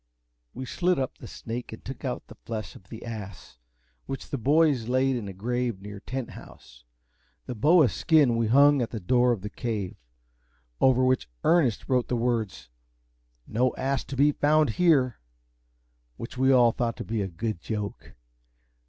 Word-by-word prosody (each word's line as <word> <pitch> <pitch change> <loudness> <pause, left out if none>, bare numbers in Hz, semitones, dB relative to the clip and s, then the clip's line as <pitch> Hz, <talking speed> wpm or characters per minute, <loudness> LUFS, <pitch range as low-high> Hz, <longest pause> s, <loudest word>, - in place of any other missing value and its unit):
We 130 - -5
slit 180 +7 0
up 130 -1 -3
the 120 - -9
snake, 120 +2 -6
and 110 - -11
took 135 - -8
out 130 -2 -3
the - - -13
flesh 110 -2 -7
of 95 - -16
the 115 - -9
ass, 100 - -8 0.5
which 135 - -6
the 140 - -1
boys 145 -2 +3
laid 130 +1 +2
in 115 -5 -4
a - - -5
grave 120 +2 -2
near 100 +1 -9
Tent 130 +4 -5
House. - - -14 0.6
The 125 - -4
boa's 150 +5 +4
skin 145 -7 +3
we 115 -1 +1
hung 140 +3 +5
up - - +2
at - - -16
the 115 - -5
door 125 +6 +3
of 115 -5 -1
the 105 - -5
Cave, 105 -7 -3 0.8
over 130 -1 +4
which 130 - +1
Ernest 160 -10 +2
wrote 125 -2 +1
the 125 - -1
words, 115 - -1 0.8
"No 125 +3 0
ass 135 -1 -1
to 135 - -6
be 145 +3 +4
found 150 -2 +3
here," 135 -5 +3 1.0
which 115 - -7
we 130 +1 +3
all 120 -3 +6
thought 115 0 -2
to - - -6
be 110 -1 -2
a 95 - -1
good 100 +2 -4
joke. 105 0 -5
120 Hz, 180 wpm, -27 LUFS, 110-135 Hz, 1.0 s, all